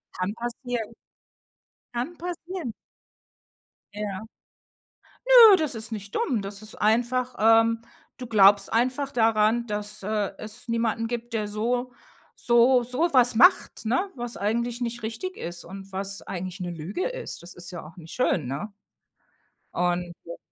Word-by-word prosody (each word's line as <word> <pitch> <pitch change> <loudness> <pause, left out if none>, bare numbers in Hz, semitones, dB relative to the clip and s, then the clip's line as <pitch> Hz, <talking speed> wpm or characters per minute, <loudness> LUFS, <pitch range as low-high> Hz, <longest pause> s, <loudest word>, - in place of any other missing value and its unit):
Kann 185 +3 -2
passieren. 240 -1 -4 1.0
Kann 255 +9 -4
passieren. 350 - -5 1.2
Ja. 205 -2 -4 1.0
Nö, 475 -5 +9
das 305 -5 0
ist 220 +1 -3
nicht 205 -2 -7
dumm. 265 - 0
Das 200 +1 -6
ist 215 0 -9
einfach, 245 +3 +1
ähm 225 +1 +4 0.4
du 250 - -7
glaubst 205 -2 +5
einfach 255 +4 0
daran, 225 0 +2
dass, 210 -1 -3
äh, 210 -1 -1
es 220 +3 -8
niemanden 230 -1 0
gibt, 240 0 -5
der 215 -2 -1
so 240 +4 -1 0.4
so 245 +1 +4
so 255 +9 0
was 250 -2 +5
macht, 360 - +4
ne, 360 - +1
was 240 -1 -5
eigentlich 235 +4 -1
nicht 240 0 -3
richtig 230 +13 -5
ist 175 0 -6
und 195 +2 -10
was 195 +1 -2
eigentlich 185 +1 -6
'ne 180 - -4
Lüge 170 - -3
ist. - - -6
Das 175 - -9
ist 175 +1 -8
ja 175 - -7
auch 165 +5 -14
nicht 165 -2 -10
schön, 185 - +1
ne? 150 - -4 1.0
Und, 175 0 -1
äh 170 - -8
225 Hz, 145 wpm, -26 LUFS, 200-245 Hz, 1.2 s, Nö